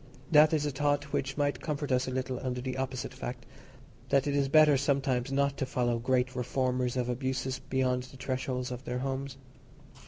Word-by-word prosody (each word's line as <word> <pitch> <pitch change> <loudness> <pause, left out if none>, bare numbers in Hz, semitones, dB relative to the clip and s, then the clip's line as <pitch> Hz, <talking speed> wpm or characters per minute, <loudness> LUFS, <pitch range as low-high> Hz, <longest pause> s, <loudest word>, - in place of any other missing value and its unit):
That 150 0 +7
is 155 -2 +1
a 145 - 0
thought 145 +1 0
which 135 +1 -1
might 145 -1 0
comfort 145 -2 -3
us 130 0 +2
a - - -2
little 130 -1 -2
under 125 -1 -2
the 130 +1 -3
opposite 130 -1 -3
fact—that 130 +2 -4
it 145 -1 0
is 140 -1 +2
better 155 0 +6
sometimes 135 -2 0
not 140 0 +1
to 135 - -1
follow 120 -2 0
great 130 +1 +1
reformers 125 0 0
of 125 -1 0
abuses 130 +1 -2
beyond 130 -1 +1
the 130 +1 -13
threshold 130 -1 -3
of 125 +1 -6
their 125 - -3
homes. 135 +1 -3
130 Hz, 185 wpm, -30 LUFS, 125-140 Hz, -, That